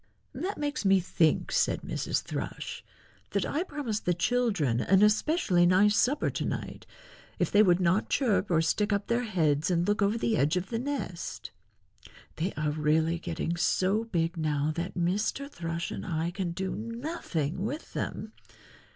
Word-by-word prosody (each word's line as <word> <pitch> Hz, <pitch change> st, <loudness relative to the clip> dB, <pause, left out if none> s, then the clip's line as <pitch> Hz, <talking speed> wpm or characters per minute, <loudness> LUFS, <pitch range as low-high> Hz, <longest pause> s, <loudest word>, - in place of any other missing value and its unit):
"That 395 Hz, +3 st, -3 dB
makes 290 Hz, -2 st, -2 dB
me 195 Hz, -1 st, +5 dB
think," 165 Hz, -3 st, +1 dB
said -, -, +1 dB
Mrs. -, -, -2 dB
Thrush, -, -, -5 dB, 0.5 s
"that -, -, +1 dB
I 310 Hz, -, -1 dB
promised 285 Hz, -, -3 dB
the 175 Hz, -, +2 dB
children 195 Hz, -, +1 dB
an 195 Hz, +1 st, +4 dB
especially 210 Hz, -, +3 dB
nice 200 Hz, +4 st, +4 dB
supper 280 Hz, +6 st, +2 dB
to -, -, -3 dB
night -, -, -5 dB, 0.5 s
if -, -, 0 dB
they 205 Hz, -, +6 dB
would 180 Hz, -4 st, +4 dB
not 185 Hz, +3 st, +2 dB
chirp 220 Hz, -7 st, +1 dB
or 165 Hz, -2 st, +3 dB
stick 205 Hz, +6 st, +1 dB
up 200 Hz, 0 st, 0 dB
their 240 Hz, +1 st, 0 dB
heads 160 Hz, -7 st, +1 dB
and 175 Hz, -1 st, +1 dB
look 205 Hz, +1 st, +1 dB
over 200 Hz, +3 st, +2 dB
the 225 Hz, -1 st, +1 dB
edge 150 Hz, +6 st, +2 dB
of 180 Hz, +1 st, -3 dB
the 230 Hz, -, -1 dB
nest. 250 Hz, -10 st, -4 dB, 0.9 s
They 175 Hz, +5 st, -1 dB
are 150 Hz, 0 st, 0 dB
really 160 Hz, +2 st, +1 dB
getting 170 Hz, 0 st, -3 dB
so 195 Hz, +5 st, +1 dB
big 170 Hz, -5 st, -1 dB
now 150 Hz, -1 st, 0 dB
that 170 Hz, +4 st, -4 dB
Mr. 195 Hz, +10 st, 0 dB
Thrush 170 Hz, -, -4 dB
and -, -, -5 dB
I 165 Hz, 0 st, -2 dB
can 185 Hz, -1 st, -3 dB
do 190 Hz, +2 st, -3 dB
nothing 230 Hz, -, -3 dB
with 280 Hz, +9 st, -5 dB
them. 215 Hz, -, -4 dB
190 Hz, 170 wpm, -29 LUFS, 170-225 Hz, 0.9 s, they